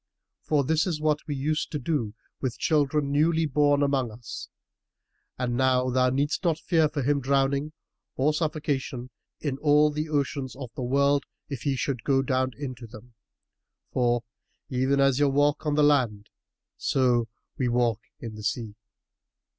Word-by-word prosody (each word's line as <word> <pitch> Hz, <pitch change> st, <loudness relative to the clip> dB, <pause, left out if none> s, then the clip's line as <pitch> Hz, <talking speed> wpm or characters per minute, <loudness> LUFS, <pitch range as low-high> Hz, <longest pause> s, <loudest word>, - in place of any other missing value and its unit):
for 150 Hz, -2 st, +1 dB
this 160 Hz, +5 st, +1 dB
is 165 Hz, -4 st, -1 dB
what 155 Hz, -1 st, +1 dB
we 145 Hz, -, -2 dB
use 150 Hz, +3 st, 0 dB
to 150 Hz, -, -4 dB
do 130 Hz, -7 st, -2 dB, 0.3 s
with 125 Hz, -4 st, -2 dB
children 150 Hz, -2 st, +1 dB
newly 160 Hz, +3 st, +3 dB
born 145 Hz, 0 st, +3 dB
among 135 Hz, -4 st, +1 dB
us; 110 Hz, +1 st, -8 dB, 0.9 s
and 125 Hz, -1 st, -1 dB
now 130 Hz, 0 st, +2 dB
thou 125 Hz, 0 st, +3 dB
needst 140 Hz, +7 st, 0 dB
not 165 Hz, -3 st, +2 dB
fear 160 Hz, -2 st, +2 dB
for 145 Hz, -3 st, -3 dB
him 140 Hz, +2 st, +1 dB
drowning 140 Hz, +2 st, +1 dB, 0.4 s
or 145 Hz, +4 st, +2 dB
suffocation 145 Hz, -5 st, -2 dB, 0.3 s
in 140 Hz, -3 st, -2 dB
all 150 Hz, 0 st, +4 dB
the 150 Hz, +1 st, -3 dB
oceans 140 Hz, -2 st, -1 dB
of 130 Hz, -3 st, -8 dB
the -, -, -6 dB
world, 140 Hz, +3 st, +2 dB, 0.2 s
if 140 Hz, -4 st, -5 dB
he 140 Hz, -2 st, 0 dB
should 130 Hz, -3 st, -2 dB
go 135 Hz, -1 st, +2 dB
down 130 Hz, 0 st, +1 dB
into 130 Hz, -4 st, -6 dB
them; 115 Hz, +2 st, -14 dB, 0.8 s
for, 120 Hz, -1 st, +1 dB, 0.5 s
even 130 Hz, +2 st, +1 dB
as 135 Hz, -1 st, +3 dB
ye 145 Hz, -, +4 dB
walk 145 Hz, +2 st, +1 dB
on 150 Hz, -, +1 dB
the 150 Hz, -, +4 dB
land, 120 Hz, -8 st, +2 dB, 0.5 s
so 125 Hz, -3 st, +2 dB, 0.3 s
walk 120 Hz, -3 st, +1 dB, 0.2 s
we -, -, -9 dB
in 115 Hz, -, -5 dB
the 105 Hz, -, -9 dB
sea." 110 Hz, -1 st, -2 dB
140 Hz, 160 wpm, -26 LUFS, 125-150 Hz, 0.9 s, all